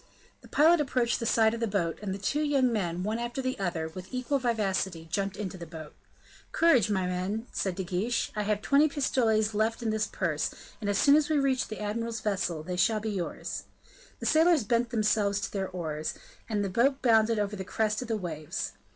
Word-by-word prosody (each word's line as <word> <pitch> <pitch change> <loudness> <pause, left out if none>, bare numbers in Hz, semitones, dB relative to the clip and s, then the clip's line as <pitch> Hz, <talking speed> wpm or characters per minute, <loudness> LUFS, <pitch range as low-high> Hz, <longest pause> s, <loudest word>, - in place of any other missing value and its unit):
The - - -15
pilot 320 +2 +5
approached 250 -4 0
the 230 - -2
side 220 -1 +4
of 230 - -4
the 230 - 0
boat, 185 -5 -1
and 205 -2 -3
the 190 - -3
two 245 +10 -1
young 275 -5 +2
men, 180 -4 -1
one 215 +3 -1
after 240 +2 -4
the 255 -3 -2
other, 170 -4 -1
with 180 +3 -9
equal 255 +2 -1
vivacity, 195 -8 -1
jumped 195 +1 -1
into 195 -3 -5
the 170 - -7
boat. 155 -2 -9 0.6
"Courage, 270 - +4
my 190 -3 +1
men," 185 +5 -2
said 190 -3 -2
De 190 - -3
Guiche; 190 +7 -1
"I 210 - 0
have 210 0 -1
twenty 285 +2 +5
pistoles 225 -6 +1
left 220 +3 0
in 225 - 0
this 215 -1 0
purse, 165 -5 -1 0.3
and 205 - -2
as 200 - +1
soon 285 0 +6
as 305 0 +2
we 310 - +2
reach 270 -2 +1
the 215 - -7
admiral's 230 +2 -3
vessel 185 -6 -1
they 180 +2 -4
shall 215 +4 +3
be 215 +1 -3
yours." 185 -4 -4 0.5
The - - -6
sailors 320 -2 +4
bent 235 +3 +1
themselves 210 -3 +1
to - - -3
their 195 -2 -2
oars, 155 -4 -4 0.3
and 205 -2 0
the - - -2
boat 265 +8 +2
bounded 225 -2 +4
over 210 0 -1
the 190 - -5
crest 215 +3 -1
of 250 - -5
the 225 -1 0
waves. 155 -6 -4
215 Hz, 215 wpm, -29 LUFS, 190-240 Hz, 0.6 s, soon